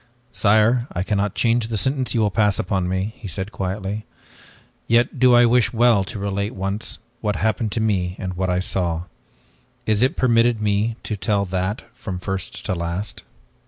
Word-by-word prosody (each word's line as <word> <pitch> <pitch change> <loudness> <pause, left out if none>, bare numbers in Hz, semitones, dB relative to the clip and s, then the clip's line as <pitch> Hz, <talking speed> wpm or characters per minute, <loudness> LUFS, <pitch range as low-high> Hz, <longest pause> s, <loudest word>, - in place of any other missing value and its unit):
"Sire, 110 +4 +3
I 85 - -1
cannot 100 0 -1
change 115 -1 +2
the 115 -1 -2
sentence 130 +3 0
you 115 - +3
will 105 -1 +2
pass 105 -1 +2
upon 95 -3 -1
me," 95 +4 -1
he 115 -5 -8
said 95 +4 -4
quietly, 100 +2 -3 0.8
"yet 120 +3 +2
do 125 -1 +6
I 120 0 +7
wish 120 -1 +3
well 115 -3 +4
to 105 - -6
relate 100 +1 -2
once, 100 +3 -3 0.2
what 105 -3 -1
happened 110 +1 0
to 115 - 0
me 95 -5 0
and 95 -1 -4
what 95 +1 -1
I 90 0 +1
saw. 85 -3 -1 0.8
Is 110 -1 +2
it 130 - +2
permitted 120 -2 +3
me 105 +2 +1
to 105 - -3
tell 100 0 0
that 95 +3 -2
from 95 -3 -6
first 95 -1 -5
to - - 0
last?" 85 +4 -4
105 Hz, 180 wpm, -22 LUFS, 95-115 Hz, 0.8 s, I